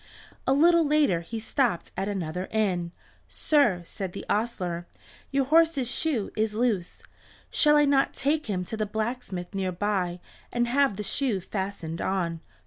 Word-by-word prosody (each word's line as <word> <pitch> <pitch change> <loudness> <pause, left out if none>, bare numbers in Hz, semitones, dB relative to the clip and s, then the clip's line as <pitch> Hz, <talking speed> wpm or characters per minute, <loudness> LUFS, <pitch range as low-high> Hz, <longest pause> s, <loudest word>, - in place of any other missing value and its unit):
A 265 - +5
little 335 +4 +5
later 290 - +3
he 225 +7 -6
stopped 230 - 0
at 195 - -2
another 180 -2 -3
inn. 185 -6 0 0.4
"Sir," 235 - +2
said 185 +1 -6
the - - -7
ostler, 180 -6 -2 0.4
"your 275 -1 +1
horse's 310 -4 +3
shoe 265 -10 0
is 215 -1 0
loose; 215 -7 -1 0.5
shall 300 -1 +5
I 295 - +5
not 275 -1 +2
take 295 +1 0
him 185 -3 -2
to 220 - -5
the 215 -1 -2
blacksmith 215 -4 -4
near 190 -1 -1
by 180 -2 -1 0.3
and 240 0 +1
have 265 -4 +2
the 210 - -3
shoe 240 -2 0
fastened 190 -3 -4
on?" 175 -4 -1
215 Hz, 155 wpm, -27 LUFS, 185-270 Hz, 0.5 s, A